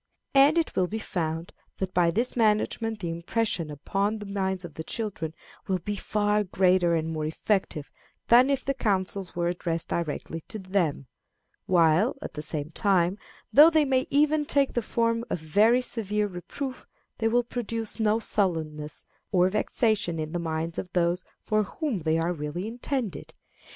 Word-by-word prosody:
And 280 +4 +6
it 330 - 0
will 185 - +2
be 215 - -4
found 165 -5 -3 0.2
that 185 -1 -3
by 175 -1 +4
this 235 +9 -1
management 220 -1 +1
the 170 -2 -2
impression 170 0 -1
upon 195 +9 -1
the 210 - -7
minds 190 -2 -2
of 165 - -9
the 160 - -6
children 165 -6 -4 0.3
will 190 - +1
be 205 +3 -4
far 210 +1 +1
greater 180 -2 +3
and 160 -1 -1
more 155 -1 -2
effective 160 -2 -1 0.4
than 245 +3 +6
if 275 -2 0
the 275 - +1
counsels 195 -6 -1
were 170 0 0
addressed 170 -1 -2
directly 165 0 -3
to - - -5
them; 185 -8 -1 0.6
while, 180 - +4
at - - -6
the 150 - -5
same 150 0 -3
time, 190 0 +2 0.3
though 300 +4 +9
they 315 -2 +3
may 260 -1 +1
even 300 +1 +3
take 280 -1 +2
the 240 - +1
form 230 +1 0
of - - -1
very 210 +11 +4
severe 210 -3 -1
reproof, 230 +8 -6 0.3
they 225 - +2
will 240 +2 +3
produce 230 -2 -4
no 215 0 +3
sullenness 160 -9 -1 0.3
or 180 -2 +4
vexation 210 -3 0
in 155 -1 -3
the 175 - -2
minds 165 0 -3
of 180 - -6
those 175 +1 +1 0.2
for 215 0 +2
whom 240 - -3
they 160 0 +1
are 165 +2 0
really 155 +5 -4
intended. 235 - -4
195 Hz, 170 wpm, -27 LUFS, 170-225 Hz, 0.6 s, though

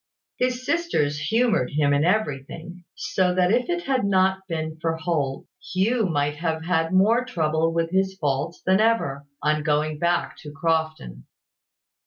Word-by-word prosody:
His 255 0 -1
sisters 260 - 0
humoured 215 - +1
him 145 -1 +2
in 140 +1 +2
everything: 175 -1 -2
so 180 -1 0
that 180 0 +3
if 245 +5 +1
it 350 0 -1
had 265 -2 0
not 190 -1 +2
been 160 -2 -4
for 165 0 -1
Holt, 155 -5 -2 0.3
Hugh 215 +4 +2
might 150 -2 -1
have 160 0 -2
had 165 -2 +1
more 215 +6 +4
trouble 160 -8 0
with 165 0 -1
his 190 0 +1
faults 150 0 -2
than 190 +1 +4
ever, 145 -12 +1 0.2
on 155 +1 +2
going 150 0 0
back 175 +1 0
to 150 - -10
Crofton. 155 - -2
165 Hz, 155 wpm, -24 LUFS, 150-190 Hz, 0.3 s, more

